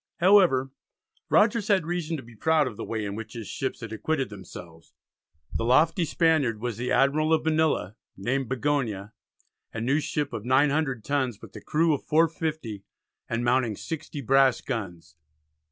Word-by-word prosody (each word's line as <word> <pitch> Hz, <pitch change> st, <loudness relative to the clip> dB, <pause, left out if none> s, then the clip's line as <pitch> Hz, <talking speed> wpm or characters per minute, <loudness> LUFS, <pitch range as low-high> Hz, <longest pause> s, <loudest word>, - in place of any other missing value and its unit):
However, 175 Hz, -9 st, +4 dB, 0.6 s
Rogers 210 Hz, 0 st, +3 dB
had 190 Hz, -6 st, +2 dB
reason 170 Hz, -1 st, -2 dB
to 135 Hz, -, -8 dB
be 115 Hz, 0 st, -15 dB
proud 160 Hz, +5 st, +2 dB
of 125 Hz, -4 st, -5 dB
the -, -, -6 dB
way 110 Hz, -2 st, -3 dB
in 100 Hz, -, -4 dB
which 110 Hz, +1 st, -7 dB
his 115 Hz, -4 st, -7 dB
ships 130 Hz, -2 st, -4 dB
had 115 Hz, -2 st, -6 dB
acquitted 135 Hz, +1 st, -2 dB
themselves. 85 Hz, -4 st, -12 dB, 0.6 s
The -, -, -1 dB
lofty 155 Hz, -, +3 dB
Spaniard 155 Hz, -9 st, +2 dB
was 120 Hz, -2 st, -4 dB
the 125 Hz, +1 st, -3 dB
Admiral 155 Hz, +3 st, +3 dB
of 160 Hz, -1 st, +2 dB
Manila, 155 Hz, -, +1 dB, 0.2 s
named 125 Hz, +6 st, -1 dB
Bigonia, 120 Hz, -6 st, -1 dB, 0.6 s
a 115 Hz, -, -5 dB
new 135 Hz, +6 st, +1 dB
ship 150 Hz, -1 st, -3 dB
of 105 Hz, -, -4 dB
900 135 Hz, -1 st, +2 dB
tons, 130 Hz, -6 st, -1 dB
with 110 Hz, -, -14 dB
a -, -, -8 dB
crew 160 Hz, +1 st, +2 dB
of 145 Hz, -, -3 dB
450 155 Hz, -, 0 dB, 0.5 s
and 115 Hz, +1 st, -1 dB
mounting 120 Hz, -3 st, +2 dB
60 150 Hz, -, -6 dB
brass 135 Hz, 0 st, +4 dB
guns. 85 Hz, -, -6 dB
135 Hz, 165 wpm, -26 LUFS, 115-155 Hz, 0.6 s, However